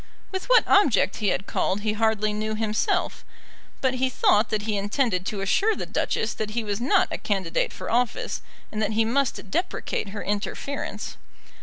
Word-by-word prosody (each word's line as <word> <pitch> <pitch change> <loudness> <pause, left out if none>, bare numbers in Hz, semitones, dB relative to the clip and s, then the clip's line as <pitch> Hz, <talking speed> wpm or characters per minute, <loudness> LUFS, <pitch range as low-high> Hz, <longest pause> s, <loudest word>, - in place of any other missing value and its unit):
With 380 -1 -3
what - - +6
object 290 - +4
he 210 - -1
had 195 - 0
called 195 0 0
he 210 0 0
hardly 215 -1 +1
knew 215 +1 -2
himself; 215 0 0 0.6
but 260 -1 +2
he 260 0 +1
thought 215 -3 +3
that 210 -1 -1
he 215 -1 -1
intended 205 -2 0
to 205 -2 -3
assure 410 - +2
the - - -4
Duchess 220 - -1
that 215 -1 -3
he 235 - +1
was 205 0 -3
not 255 - +3
a - - -3
candidate 190 -5 0
for 185 - -6
office, 240 0 0 0.3
and 215 - -3
that 215 0 0
he 225 +1 +3
must 240 -4 -1
deprecate 345 - -2
her 205 +1 -5
interference. 210 +2 -3
215 Hz, 180 wpm, -25 LUFS, 205-245 Hz, 0.6 s, what